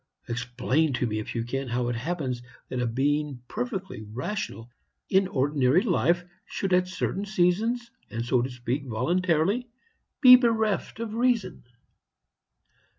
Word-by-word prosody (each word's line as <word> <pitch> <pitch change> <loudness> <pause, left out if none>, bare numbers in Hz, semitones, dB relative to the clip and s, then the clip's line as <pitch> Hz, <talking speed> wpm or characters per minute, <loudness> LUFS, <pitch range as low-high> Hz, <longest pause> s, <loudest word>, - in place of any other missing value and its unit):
Explain 125 +5 0
to 125 - 0
me, 110 -2 -2
if 110 - -6
you 115 - 0
can, 135 +3 -3
how 120 0 -1
it 120 - -1
happens 130 -2 -3 0.3
that 130 - -3
a 120 - 0
being 145 +3 0
perfectly 195 - -4
rational 115 - -5 0.4
in 190 0 +4
ordinary 145 +1 +2
life 175 -4 +2 0.2
should 195 -2 -2
at 180 0 +3
certain 185 +1 -2
seasons, 215 +5 +1 0.2
and, 115 +1 -4
so 125 0 +2
to 125 - -2
speak, 125 +3 -3
voluntarily, 175 - +1 0.5
be 255 -3 +10
bereft 220 -4 +1
of 230 -2 -4
reason. 230 - 0
155 Hz, 140 wpm, -27 LUFS, 125-195 Hz, 0.5 s, be